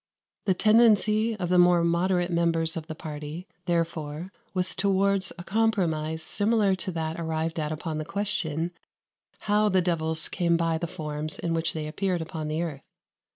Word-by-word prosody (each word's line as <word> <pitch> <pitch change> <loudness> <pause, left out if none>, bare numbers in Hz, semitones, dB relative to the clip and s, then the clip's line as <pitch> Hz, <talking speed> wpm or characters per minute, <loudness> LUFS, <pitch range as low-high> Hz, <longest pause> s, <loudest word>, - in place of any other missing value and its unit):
The 190 - +3
tendency 220 +1 +4
of 180 -4 -3
the 180 0 +4
more 175 -1 +5
moderate 175 +1 +1
members 165 -1 +2
of 160 -1 -5
the 160 - -5
party, 155 +2 -6 0.2
therefore 165 0 -2 0.2
was 185 -1 -1
towards 195 -1 +1
a 175 - -7
compromise 170 -7 0
similar 205 +1 +2
to 185 - -4
that 160 0 -3
arrived 160 0 -2
at 150 0 -2
upon 155 0 -3
the - - -2
question 170 -3 -2 0.7
how 210 0 +3
the 190 -1 +3
devils 160 -3 0
came 170 -1 +1
by 165 -1 0
the 170 - -2
forms 155 -3 -4
in 165 - -2
which 165 0 0
they 155 -1 -3
appeared 180 +1 -1
upon 160 -1 -5
the 155 +2 -1
earth. 150 -5 -5
170 Hz, 165 wpm, -27 LUFS, 160-190 Hz, 0.7 s, more